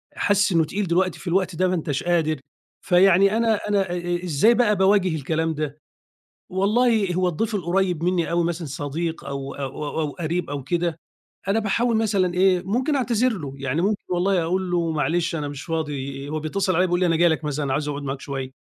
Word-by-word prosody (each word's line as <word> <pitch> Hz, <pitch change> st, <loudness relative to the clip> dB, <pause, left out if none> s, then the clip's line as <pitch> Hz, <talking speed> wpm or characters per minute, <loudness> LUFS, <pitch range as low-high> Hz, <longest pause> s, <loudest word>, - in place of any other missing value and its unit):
حاسس 205 Hz, 0 st, +2 dB
إنه 165 Hz, -2 st, +3 dB
تقيل 195 Hz, +5 st, -3 dB
دلوقتي 180 Hz, +1 st, +1 dB
في -, -, -11 dB
الوقت 185 Hz, 0 st, 0 dB
ده 185 Hz, +3 st, +2 dB
ما 185 Hz, -, 0 dB
أنتش 150 Hz, -5 st, -2 dB
قادر. 160 Hz, -4 st, +1 dB, 0.5 s
فيعني 195 Hz, +3 st, +5 dB
أنا 225 Hz, -1 st, +3 dB
أنا 195 Hz, -3 st, +1 dB
إ -, -, -1 dB
إ 175 Hz, 0 st, -2 dB
إزاي 180 Hz, +8 st, +4 dB
بقى 235 Hz, -3 st, +3 dB
باواجه 190 Hz, -2 st, +3 dB
الكلام 160 Hz, +2 st, -1 dB
ده، 150 Hz, -1 st, -4 dB, 0.7 s
والله 210 Hz, +1 st, +2 dB
هو 185 Hz, 0 st, +2 dB
الضيف 210 Hz, +6 st, -1 dB
القريب 180 Hz, -2 st, 0 dB
مني 175 Hz, -2 st, 0 dB
أوي 170 Hz, 0 st, +2 dB
مثلًا 170 Hz, -1 st, -3 dB
صديق 150 Hz, +4 st, -4 dB
أو 140 Hz, -1 st, -5 dB
أو 135 Hz, -2 st, -5 dB
أو 155 Hz, +2 st, -2 dB
أو 150 Hz, -, -1 dB
قريب، 170 Hz, +1 st, -3 dB
أو 140 Hz, -1 st, -4 dB
كده 170 Hz, +3 st, -1 dB, 0.5 s
أنا 200 Hz, +3 st, +2 dB
باحاول 225 Hz, +2 st, +1 dB
مثلًا 200 Hz, -5 st, +1 dB
إيه 185 Hz, 0 st, +3 dB
ممكن 255 Hz, +9 st, 0 dB
أعتذر 250 Hz, -1 st, +1 dB
له، 140 Hz, -6 st, -6 dB
يعني 135 Hz, +4 st, -1 dB
ممكن 205 Hz, +2 st, 0 dB
والله 180 Hz, +1 st, +1 dB
أقول 180 Hz, +2 st, -1 dB
له: 170 Hz, -2 st, +1 dB
"معلش 165 Hz, +2 st, 0 dB
أنا 150 Hz, -2 st, -3 dB
مش 145 Hz, -1 st, -7 dB
فاضي"، 145 Hz, -4 st, -4 dB
هو 155 Hz, +1 st, -2 dB
بيتصل 185 Hz, +4 st, -1 dB
عليَّ 185 Hz, +2 st, +3 dB
بيقول 175 Hz, 0 st, +1 dB
لي 185 Hz, -, +2 dB
أنا 165 Hz, -1 st, +2 dB
جاي 170 Hz, +1 st, +4 dB
لك 160 Hz, 0 st, -1 dB
مثلًا 145 Hz, -2 st, -1 dB
عايز 145 Hz, +2 st, -1 dB
أقعد 145 Hz, -1 st, -4 dB
معاك 135 Hz, 0 st, -4 dB
شوية، 135 Hz, -2 st, -5 dB
175 Hz, 205 wpm, -23 LUFS, 155-195 Hz, 0.7 s, فيعني